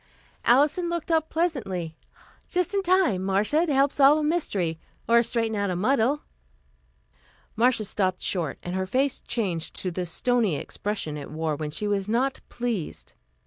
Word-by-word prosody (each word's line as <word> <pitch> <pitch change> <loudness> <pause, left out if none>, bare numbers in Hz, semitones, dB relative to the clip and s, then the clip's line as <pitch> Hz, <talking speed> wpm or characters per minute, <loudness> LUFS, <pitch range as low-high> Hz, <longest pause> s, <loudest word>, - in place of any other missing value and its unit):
Alison 295 +8 +3
looked 340 0 -3
up 320 -1 +2
pleasantly. 200 - -2 0.5
"Just 360 +1 0
in 400 - +2
time, 360 - +2
Marcia, 210 - +2
to 295 - +1
help 275 +1 +4
solve 285 +2 +6
a 310 - -1
mystery, 200 - -1 0.3
or 235 0 +6
straighten 225 -2 -1
out 200 -1 0
a 180 - -1
muddle." 255 +8 +1 1.3
Marcia 235 0 +3
stopped 190 -2 -1
short 165 -7 -1
and 175 - -4
her 190 0 -1
face 265 +6 +1
changed 185 -9 -3
to 185 - -3
the 180 +1 -3
stony 225 0 +1
expression 195 -2 -4
it 145 - -7
wore 155 0 -2
when 150 0 -4
she 210 +8 -3
was 200 -1 -1
not 255 +4 0
pleased. 235 -9 -4
225 Hz, 160 wpm, -26 LUFS, 185-285 Hz, 1.3 s, solve